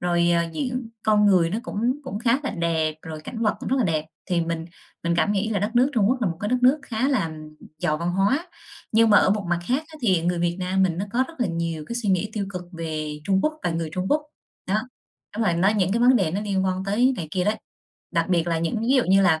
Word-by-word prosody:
Rồi, 175 -1 +2
ờ, 170 0 +3
diễn 250 - -3
con 210 -1 +4
người 180 -4 +4
nó 215 - -1
cũng 245 +5 -1
cũng 210 -6 -4
khá 235 +2 +2
là 280 - -2
đẹp, 160 -2 0
rồi 155 -1 -7
cảnh 230 -2 -5
vật 215 - +2
cũng - - -4
rất 265 - +1
là 250 - +2
đẹp, 155 -4 0 0.2
thì 175 -3 +1
mình 165 -1 -2 0.4
mình 170 0 +1
cảm 205 - +2
nghĩ 205 +2 0
là 205 - +1
đất 205 +3 -1
nước 260 +4 +4
Trung 215 -4 +3
Quốc 255 0 +1
là 220 - +1
một 165 - -4
cái 205 - -2
đất 250 - +2
nước 260 +4 +5
khá 240 +3 -1
là 210 - +1 0.5
giàu 155 -2 0
văn 170 +2 -1
hóa. 235 - +1 0.4
Nhưng 225 0 +5
mà 205 - +8
ở - - +3
một 205 0 0
mặt 175 - +2
khác 265 +5 +1
á 315 - -14
thì 185 -7 +3
người 175 0 0
Việt 175 0 0
Nam 185 +1 +1
mình 175 -3 +1
nó 195 - -1
có 255 +2 +2
rất 325 -6 -13
là 240 - +2
nhiều 165 -2 -3
cái 235 - -4
suy 225 -4 -2
nghĩ 190 +3 +1
tiêu 200 -3 -2
cực 180 -2 -5
về 155 -2 -4
Trung 195 +1 +2
Quốc 305 - +1
và 175 - 0
người 165 -1 -2
Trung 185 +1 -2
Quốc. 300 +1 +2 0.5
Đó, 200 - +2 0.6
đúng 225 - 0
rồi 175 -4 +2
nó 185 +4 +3
những 190 -1 +1
cái 235 - +1
vấn 250 +1 +6
đề 190 -8 +1
nó 195 +5 -2
liên 195 -2 -1
quan 185 0 -1
tới 235 +7 +3
này 165 -3 -5
kia 180 +2 0
đấy. 210 +2 +1 0.6
Đặc - - +1
biệt 175 -2 +2
là 165 -1 0
những 165 +7 -1
ví 240 +4 +2
dụ 255 - +3
như 195 +1 +4
là 160 -4 +3
190 Hz, 280 wpm, -24 LUFS, 170-230 Hz, 0.6 s, mà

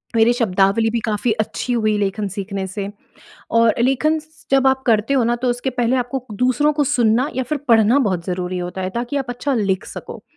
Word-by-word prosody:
मेरे 225 +1 +5
शब्दावली 205 -1 +2
भी 235 - 0
काफ़ी 220 +1 0
अच्छी 245 +3 -3
हुई 215 -3 +1
लेखन 205 +1 -1
सीखने 195 0 -4
से 195 +1 -5 0.7
और 230 -1 +4
लेखन 290 +5 +2
स 315 +1 -23
जब 270 0 +4
आप 265 0 +2
करते 225 +3 +2
हो 255 -4 +3
ना 240 +1 +1
तो 250 +1 -2
उसके 245 +2 -2
पहले 245 0 0
आपको 250 +2 -1
क 240 -4 -11
दूसरों 255 +4 +2
को 295 0 +1
सुनना 245 +2 +2
या 260 - +1
फ़िर 295 +4 -2
पढ़ना 225 +2 +5
बहुत 185 -10 0
ज़रूरी 180 0 -3
होता 180 +1 -5
है, 185 - -2
ताकि 240 +6 -3
आप 270 -3 -2
अच्छा 255 +3 -2
लिख 200 -2 0
सको। - - -9
235 Hz, 215 wpm, -20 LUFS, 205-260 Hz, 0.7 s, मेरे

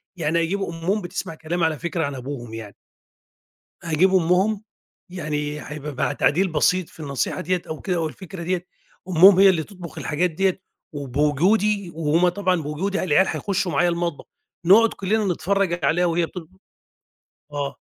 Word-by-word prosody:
يعني 165 -1 0
أجيب 195 +4 -2
أمهم 170 +4 -2
بتسمع 170 -2 -5
كلامي 165 +2 -1
على 155 -3 -1
فكرة 170 -2 -2
عن 140 - -4
أبوهم 125 -3 -7
يعني. 110 -3 -8 1.1
هاجيب 170 +3 +3
أمهم 190 +4 +2 0.5
يعني 150 -4 -3
هيبقى 150 -1 -7
مع 140 - 0
تعديل 185 +6 +2
بسيط 180 +3 +2
في - - -16
النصيحة 140 -3 -2
ديّة 180 +1 -1
أو 155 - -5
كده 185 -3 -1
أو 160 -2 0
الفكرة 185 +1 -9
ديّة، 180 +1 -2 0.4
أمهم 185 +2 +7
هي 195 0 +8
اللي 170 -4 +3
تطبخ 180 -3 -10
الحاجات 175 +4 0
ديّة 190 +2 0 0.3
وبوجودي، 165 - +1
وهُم 165 +3 +2
طبعًا 180 -2 0
بوجودي 185 +7 -2
العيال 185 +2 +3
هيخشوا 190 -4 -1
معايا 175 +5 +3
المطبخ 170 -3 -2 0.4
نقعد 215 +6 +7
كلنا 210 +3 0
نتفرج 190 -2 0
عليها 175 +2 +3
وهي 170 0 +1
بتطب 160 - -10 1.0
آه. 145 -1 -3
170 Hz, 155 wpm, -23 LUFS, 150-185 Hz, 1.1 s, هي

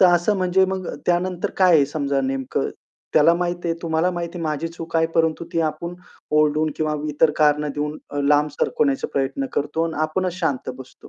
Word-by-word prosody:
तर 185 - +8
असं 175 +4 +3
म्हणजे 185 +1 +3
मग 190 -1 -3 0.2
त्यानंतर 180 0 0
काय 180 -3 +6
आहे 140 -2 +4
समजा 140 -2 -1
नेमकं 135 -1 -1 0.5
त्याला 155 +2 +6
माहिती 175 0 -2
आहे, 165 - +1
तुम्हाला 165 +2 +1
माहिती 175 0 -4
आहे, - - -5
माझी 155 +1 -2
चूक 165 0 -5
आहे 165 0 +3
परंतु 160 0 +1
ती 165 - +1
आपण 170 +2 -2 0.4
ओरडून 155 +1 +3
किंवा 155 -1 0 0.2
इतर 150 +1 +3
कारणं 150 -1 +3
देऊन 150 +1 -2
अ, 145 - -4
लांब 145 +1 +3
सरकवण्याचा 140 -2 +1
प्रयत्न 140 - -1
करतो 150 +3 -1
आणि 165 - -3
आपणच 180 +3 -1
शांत 140 -7 -1
बसतो. 130 -1 -13
160 Hz, 190 wpm, -22 LUFS, 150-175 Hz, 0.5 s, तर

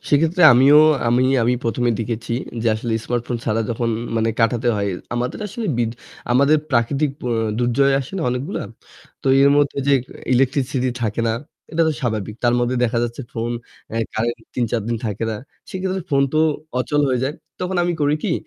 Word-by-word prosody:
সেক্ষেত্রে 165 +5 +3
আমিও 135 +5 +7 0.3
আমি 125 +2 +3 0.2
আমি 120 +2 +2
প্রথমে 120 +1 +1
দেখেছি 115 +1 -3 0.3
যে - - -1
আসলে 115 +1 -3
স্মার্টফোন 120 0 -2
ছাড়া 115 0 0
যখন 115 0 -1 0.3
মানে 115 0 +1
কাটাতে 120 +1 +2
হয়, 100 -1 -1 0.2
আমাদের 120 +1 -2
আসলে 225 +3 -5
বিদ 115 -2 +1 0.4
আমাদের 140 +5 +5
প্রাকৃতিক 135 +4 +1
অ্যা 120 - 0 0.3
দুর্যোগ 125 +3 +2
আসে 135 - -9
না - - -2
অনেকগুলা। 125 +3 -3 0.6
তো - - -7 0.2
এর 140 - +6
মধ্যে 145 -1 +1
যে - - +5 0.4
ইলেকট্রিসিটি 130 0 +1
থাকে 110 0 -1
না, - - +1 0.4
এটা 165 +1 +2
তো - - +1
স্বাভাবিক, 110 -5 -2
তার 120 0 +4
মধ্যে 120 +1 0
দেখা 120 0 0
যাচ্ছে 120 +2 -3
ফোন 115 +1 -3 0.4
অ্যা 115 - -2 0.2
কারেন্ট 115 +2 -1 0.2
৩-৪ 120 -1 0
দিন 120 - 0
থাকে 105 +1 -3
না। 110 - -3 0.3
সেক্ষেত্রে 190 0 -3
ফোন 140 -1 +3
তো - - +3 0.4
অচল 145 +3 +1
হয়ে 125 -1 0
যায়। 145 - -4 0.3
তখন 185 0 -2
আমি 175 0 0
করি 145 +1 +2
কি? 195 - +1
125 Hz, 180 wpm, -21 LUFS, 115-140 Hz, 0.6 s, আমিও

